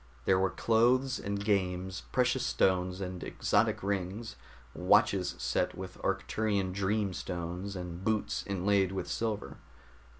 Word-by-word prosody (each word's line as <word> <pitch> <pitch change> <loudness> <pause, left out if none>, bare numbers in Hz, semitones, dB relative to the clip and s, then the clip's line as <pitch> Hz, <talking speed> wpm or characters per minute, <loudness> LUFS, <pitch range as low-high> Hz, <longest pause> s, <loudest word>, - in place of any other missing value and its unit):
There 95 - +4
were 95 0 +2
clothes 125 +6 +2
and 100 0 -3
games, 95 -2 0
precious 125 0 +2
stones 90 0 +1
and 90 -1 -5
exotic 110 0 +1
rings, 100 +3 -2 0.4
watches 95 -1 +3
set - - -1
with - - -8
Arcturian 100 -4 0
dream 100 0 0
stones, 90 +3 -4
and 90 0 -6
boots 110 0 0
inlaid 100 0 +2
with 95 - -3
silver. 110 -2 -3
100 Hz, 125 wpm, -31 LUFS, 90-105 Hz, 0.4 s, There